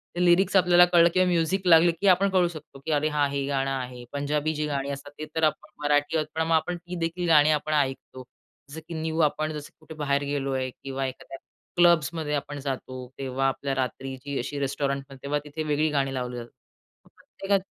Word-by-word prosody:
ते 180 - +1
लिरिक्स 185 +3 +4
आपल्याला 175 -1 +7
कळलं 170 -1 +5
किंवा 185 0 +3
म्युझिक 180 +2 +1
लागली 170 0 +7
की, 185 +4 -2
आपण 195 +2 +5
कळू 185 -2 +3
शकतो 155 -4 -10
की 160 - -2
अरे 150 +1 +2
हां, 145 -1 +1
हे 140 -1 -2
गाणं 135 -1 0
आहे. 125 -2 -5
पंजाबी 150 +2 -1
जी 150 0 -1
गाणी 140 -1 -2
असतात 140 +1 -7
ते 155 - -4
तर 160 - -1
आपण 155 - +1
मराठी 145 +1 +2
आहोत, 155 -1 -1
पण 160 - 0
मग 165 - +3
आपण 175 +2 0
ती 175 +1 -8
देखील 170 +1 -2
गाणी 150 -1 +6
आपण 155 0 0
ऐकतो. 135 -2 -2 0.5
जसं 160 +3 -7
की 170 - -7
न्यू 160 0 -3
आपण, 155 0 +1
जसं 150 -1 -7
कुठे 160 - -11
बाहेर 140 -2 0
गेलोय 135 -2 -2
किंवा 135 0 -3
एखाद्या 130 +1 -7 0.4
क्लब्समध्ये 165 -3 +3
आपण 145 0 -3
जातो, 130 -2 -5
तेव्हा 135 0 -1
आपल्या 135 0 -2
रात्रीची 135 +2 -4
अशी 140 +4 -4
रेस्टॉरंटमध्ये, 140 0 -2
तेव्हा 145 +1 -1
तिथे 155 +2 -5
वेगळी 150 +1 +1
गाणी 135 -2 0
लावली 125 -1 -4
जातात. 120 0 -8 0.5
मग - - -23
प्रत्येकात 195 -1 -2
150 Hz, 205 wpm, -26 LUFS, 135-165 Hz, 0.5 s, आपल्याला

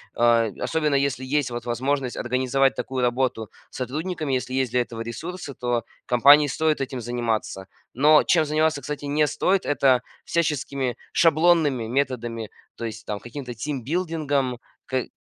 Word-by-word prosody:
а, 115 -1 +4
особенно, 155 -3 0
если 140 -1 0
есть 135 0 0
вот 120 0 -5
возможность 130 +2 -1
организовать 130 +2 +1
такую 130 -1 -3
работу 120 -3 0 0.2
с - - -11
сотрудниками, 155 +3 -3
если 130 0 -2
есть 130 -3 0
для 125 - +2
этого 115 -1 -6
ресурсы, 155 +7 -6
то 120 -2 -1 0.2
компании 145 +5 +6
стоит 155 +1 0
этим 130 -1 -3
заниматься. 115 -5 -3 0.3
Но 150 +4 +5
чем 165 -3 +3
заниматься, 155 -1 +1
кстати, 145 +2 -5
не 150 +2 +2
стоит- 190 +5 +1
это 135 -3 +3 0.2
всяческими 140 -6 -1 0.2
шаблонными 160 -6 +3
методами, 120 -4 -2 0.3
то - - -8
есть 110 0 -7
там 105 -1 -4
каким-то 125 +2 -7
тимбилдингом. 145 +1 -2 0.3
К... 130 -1 -1
135 Hz, 145 wpm, -24 LUFS, 120-150 Hz, 0.3 s, компании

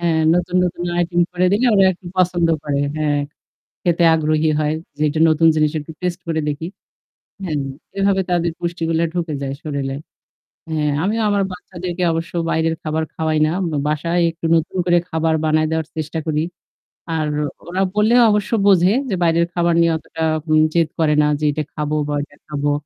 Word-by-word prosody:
হ্যাঁ। 165 -2 +1
নতুন, 180 +1 0
নতুন 175 0 -3 0.2
item 175 0 0
করে 180 0 +2
দিলে 225 +6 +2
ওরা 195 -1 +5
একটু 180 +1 -15
পছন্দ 175 -2 +2 0.2
করে। 140 -1 0 0.2
হ্যাঁ। 150 -1 +1 0.6
খেতে 175 -1 +2
আগ্রহী 155 0 +1
হয়। 155 0 0 0.2
যে 150 - -4
এটা 155 +2 -2
নতুন 160 +1 +3
জিনিস 155 -1 +2
একটু 155 +2 -9
taste 180 0 -2
করে 160 -1 0
দেখি। 150 +2 -3 0.8
হ্যাঁ। 160 -5 -2 0.4
এভাবে 195 -1 +2
তাদের 170 -1 +1
পুষ্টিগুলা 165 -1 -1
ঢুকে 170 -3 -2
যায় 135 0 -3
শরীরে। 140 -3 -3 0.7
হ্যাঁ, 150 -2 0
আমি 210 +3 0
আমার 205 -1 +2
বাচ্চাদেরকে 180 0 -5
অবশ্য 165 +1 -3 0.2
বাইরের 160 0 +1
খাবার 155 0 -1
খাওয়াই 160 -1 -1
না। - - -1 0.4
বাসায় 170 +4 0
একটু 165 0 -9
নতুন 165 +3 -1
করে 175 -1 +4
খাবার 160 0 +1
বানায় 155 0 +2
দেওয়ার 160 -1 -1
চেষ্টা 155 +1 -3
করি। 155 0 0 0.7
আর 155 -1 0 0.4
ওরা 185 +2 -2
বললেও 225 +4 +4
অবশ্য 210 -1 0 0.2
বোঝে 190 0 +5 0.2
যে 195 - 0
বাইরের 170 0 +3
খাবার 170 -1 +2
নিয়ে 170 - +3
অতটা 160 0 -6 0.3
উম 155 0 +5
জেদ 165 -2 +2
করে 155 -2 +3
না 150 - +3
যে 155 - -1
এটা 155 +1 -2
খাবো 150 0 -2
বা 150 - -2
ওইটা 145 0 -7
খাবো। 145 -1 -1
165 Hz, 175 wpm, -19 LUFS, 155-175 Hz, 0.8 s, ওরা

